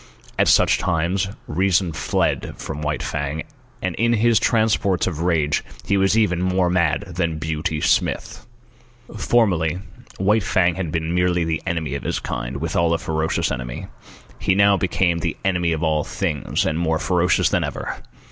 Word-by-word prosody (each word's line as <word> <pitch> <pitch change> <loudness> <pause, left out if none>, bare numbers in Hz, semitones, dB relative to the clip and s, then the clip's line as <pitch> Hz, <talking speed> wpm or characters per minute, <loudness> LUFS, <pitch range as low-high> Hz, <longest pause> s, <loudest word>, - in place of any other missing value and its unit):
At - - +4
such - - +4
times 90 +2 0 0.2
reason 90 +1 +1
fled - - -1
from 75 -1 -6
White 75 0 -2
Fang, 75 +1 -3 0.4
and 95 -1 -1
in 115 +1 +2
his 115 0 +3
transports 110 -6 +2
of 80 -4 -3
rage 80 -4 +1 0.2
he 100 - +1
was 95 +2 +3
even 90 -6 +2
more 90 -1 +1
mad 85 -3 +2
than 85 -3 -2
Beauty 80 0 -2
Smith. - - 0 0.7
Formerly, 90 -8 +2 0.4
White 105 +4 +2
Fang 90 -2 +2
had 85 -3 -4
been 80 0 -2
merely 90 -1 +2
the 80 -1 -1
enemy 80 -5 -2
of 70 - -3
his - - -2
kind, - - -4
withal 85 +2 +1
a - - 0
ferocious 80 0 -1
enemy. - - -5 0.5
He 95 - +1
now 100 0 +5
became 90 -2 +1
the 85 -1 -2
enemy 90 -3 +1
of 80 -1 -1
all 80 -2 +1
things, 85 -6 -2
and 80 +1 0
more 80 -2 +1
ferocious 90 0 +2
than - - +1
ever. - - -5
85 Hz, 165 wpm, -21 LUFS, 80-95 Hz, 0.7 s, now